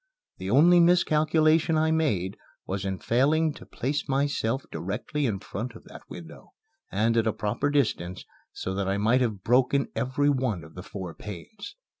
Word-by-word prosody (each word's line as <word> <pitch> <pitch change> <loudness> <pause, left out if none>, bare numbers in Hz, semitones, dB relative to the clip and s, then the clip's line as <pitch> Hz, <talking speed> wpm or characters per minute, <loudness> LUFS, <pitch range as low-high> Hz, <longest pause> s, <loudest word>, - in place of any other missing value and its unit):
The 95 - -4
only 165 - +6
miscalculation 160 -2 +3
I 160 0 +2
made 105 - 0 0.3
was 95 +1 -3
in 95 -1 -2
failing 150 - +2
to - - -13
place 140 +3 -3
myself 135 -2 0
directly 120 +9 -2
in 105 -4 -1
front 115 +4 -6
of - - -12
that - - -12
window, - - -11 0.4
and 115 +2 +1
at 115 0 +2
a 110 - +1
proper 105 +7 -1
distance, 105 -11 -1 0.3
so 95 - -4
that 95 0 -2
I 95 +1 0
might 115 +5 +3
have 105 -6 -1
broken 130 +3 +2
every 145 +3 +1
one 125 - -1
of 80 +1 -14
the 90 - -8
four 95 -3 -7
panes. 105 - -9
125 Hz, 170 wpm, -27 LUFS, 100-150 Hz, 0.4 s, only